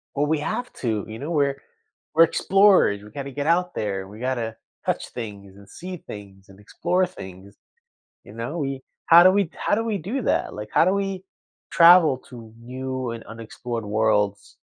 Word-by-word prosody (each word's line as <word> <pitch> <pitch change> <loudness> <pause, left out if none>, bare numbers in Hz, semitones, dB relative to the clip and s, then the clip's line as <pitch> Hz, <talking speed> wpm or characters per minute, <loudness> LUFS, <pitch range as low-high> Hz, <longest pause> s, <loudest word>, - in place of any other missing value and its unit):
Well, 145 +1 +1
we 155 0 +1
have 245 +11 -3
to, 110 -5 -2
you 110 +1 -8
know, 150 +6 -5
we're 140 -3 0 0.5
we're 165 +1 +7
explorers, 190 - +4
we 105 - -12
gotta 140 +4 -7
get 145 +2 -4
out 180 +2 +2
there, 95 -3 -3
we 105 +2 -12
gotta 120 -3 -2 0.3
touch - - -2
things 100 -5 -8
and 100 0 -16
see 180 - -8
things 100 - -12
and 95 +1 -16
explore 180 - 0
things, 95 - -12 0.7
you - - -13
know, 115 +9 -5
we 135 -2 -3 0.3
How 170 +1 +8
do 185 - +7
we 195 -4 +1
How 205 - 0
do 225 +2 -1
we 215 -3 -1
do 215 - -4
that? - - 0
Like, 105 0 -7
how - - +5
do 185 - +3
we 195 -1 -3 0.5
travel 170 -5 +6
to 115 -3 -12
new 130 +1 -5
and 115 -1 -7
unexplored 115 +1 -7
worlds 105 -1 0
130 Hz, 185 wpm, -23 LUFS, 105-170 Hz, 0.7 s, How